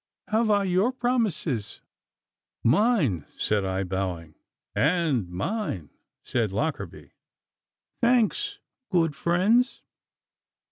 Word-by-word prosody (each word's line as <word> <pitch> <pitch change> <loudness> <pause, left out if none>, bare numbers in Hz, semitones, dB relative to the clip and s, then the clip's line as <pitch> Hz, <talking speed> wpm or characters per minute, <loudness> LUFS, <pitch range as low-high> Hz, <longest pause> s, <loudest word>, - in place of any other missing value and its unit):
Have 220 +1 +2
I 205 -1 +4
your 190 +5 +2
promises?' 220 - -1 0.8
'Mine,' 140 - +3
said 105 -2 +1
I, 95 0 -1
bowing. 90 -4 -3 0.4
'And 150 - +1
mine,' 95 - -3 0.3
said 110 -5 0
Lockarby. 145 +10 -3 0.9
'Thanks, 255 - +2 0.3
good 165 -5 +2
friends. 200 - +2
170 Hz, 85 wpm, -26 LUFS, -, 0.9 s, I